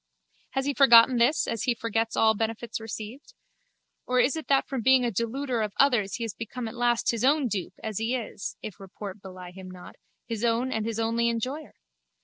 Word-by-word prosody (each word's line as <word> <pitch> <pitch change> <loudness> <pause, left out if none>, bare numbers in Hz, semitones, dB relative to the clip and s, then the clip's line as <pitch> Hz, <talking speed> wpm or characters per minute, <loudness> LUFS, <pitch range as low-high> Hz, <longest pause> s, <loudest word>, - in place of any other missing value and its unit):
Has 270 0 -1
he 285 - 0
forgotten 250 -2 +7
this 245 +7 +3
as 230 - -3
he 245 -2 +1
forgets 225 0 -2
all 220 0 +5
benefits 225 +2 -3
received? 225 - -8 0.7
Or 250 0 +2
is 250 +5 +3
it 320 - -6
that 275 -1 +3
from 265 -3 -3
being 260 +1 +4
a 235 - 0
deluder 235 +3 -2
of 210 -2 -2
others 240 -8 +3
he 235 - -4
has 225 -3 -4
become 230 +1 -6
at 220 - -7
last 240 -1 +1
his 230 -1 -3
own 285 0 +3
dupe 200 -5 -4
as 220 -2 -3
he 225 +3 0
is, 225 -4 -5
if 210 - -7
report 195 +1 -9
belie 185 -2 -10
him 185 0 -10
not, 180 -1 -12 0.3
his 230 -1 -4
own 240 +2 +1
and 220 -2 -2
his 230 -1 -3
only 230 +1 +1
enjoyer? 255 +7 -4
230 Hz, 205 wpm, -27 LUFS, 220-255 Hz, 0.7 s, forgotten